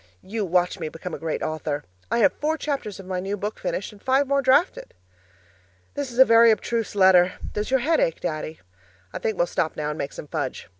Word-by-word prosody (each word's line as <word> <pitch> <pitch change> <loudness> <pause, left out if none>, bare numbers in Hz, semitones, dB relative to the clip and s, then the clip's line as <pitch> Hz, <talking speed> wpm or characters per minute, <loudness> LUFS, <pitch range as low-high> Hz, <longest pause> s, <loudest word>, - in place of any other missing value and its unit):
You 210 +1 -3
watch 180 +1 +1
me 160 -2 -3
become 165 +2 -8
a - - -5
great 165 -1 -3
author! 155 -2 -3 0.3
I 235 - +1
have - - +3
four 310 +2 -1
chapters 275 -11 -4
of 195 - -9
my 185 -1 -3
new 195 +3 -3
book 210 +2 -4
finished 190 - -3
and 205 -1 -17
five 265 +2 +2
more 280 0 +2
drafted. 275 +7 +2 1.0
This 285 -3 -4
is 240 - -10
a 260 - +9
very 230 0 +6
abstruse 225 0 0
letter 185 -2 +5 0.2
does 210 0 -3
your 265 -1 +2
head 320 +5 +2
ache, 165 - +1
Daddy? 155 0 -4 0.5
I - - -4
think 220 -3 -2
we'll 175 - +3
stop 160 -2 -2
now 150 -1 -2
and 150 - -5
make 140 - -4
some - - -8
fudge. 140 -2 -4
200 Hz, 220 wpm, -24 LUFS, 165-250 Hz, 1.0 s, a